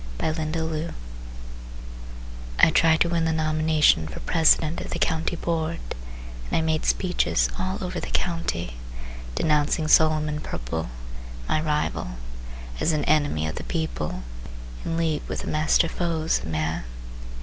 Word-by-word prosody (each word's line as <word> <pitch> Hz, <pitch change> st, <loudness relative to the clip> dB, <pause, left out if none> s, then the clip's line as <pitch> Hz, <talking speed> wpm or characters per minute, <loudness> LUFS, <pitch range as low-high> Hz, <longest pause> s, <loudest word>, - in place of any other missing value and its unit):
Hiram 155 Hz, -1 st, -1 dB
Scates 160 Hz, 0 st, -2 dB, 1.6 s
I -, -, +7 dB
tried 160 Hz, 0 st, +4 dB
to 170 Hz, -, +4 dB
win 165 Hz, -1 st, +1 dB
the 160 Hz, -, +2 dB
nomination 155 Hz, -, +3 dB
For 75 Hz, -, -7 dB
president 160 Hz, -1 st, +3 dB
of -, -, -6 dB
the -, -, -2 dB
County 165 Hz, +1 st, 0 dB
board 165 Hz, -1 st, -1 dB, 0.7 s
And -, -, +1 dB
I -, -, +2 dB
made 160 Hz, -1 st, 0 dB
speeches 180 Hz, -2 st, +2 dB
all 185 Hz, +1 st, -1 dB
over 180 Hz, -, -3 dB
the -, -, -5 dB
County 85 Hz, -, -1 dB, 0.6 s
Denouncing 150 Hz, 0 st, +2 dB
Solomon 155 Hz, -1 st, +4 dB
Purple, 80 Hz, -, -4 dB, 0.6 s
my 155 Hz, -, +1 dB
rival, 150 Hz, -, -1 dB, 0.6 s
As 160 Hz, -, +2 dB
an 150 Hz, -, 0 dB
enemy 145 Hz, -, +2 dB
of 80 Hz, -, -4 dB
the -, -, -4 dB
people, 120 Hz, -, -3 dB, 0.6 s
In 165 Hz, -, -2 dB
league 160 Hz, -3 st, +1 dB
with -, -, -3 dB
the -, -, -7 dB
master 155 Hz, +2 st, +3 dB
foes 165 Hz, -1 st, 0 dB
of -, -, -8 dB
man. 80 Hz, -1 st, -1 dB
155 Hz, 140 wpm, -25 LUFS, 150-165 Hz, 1.6 s, I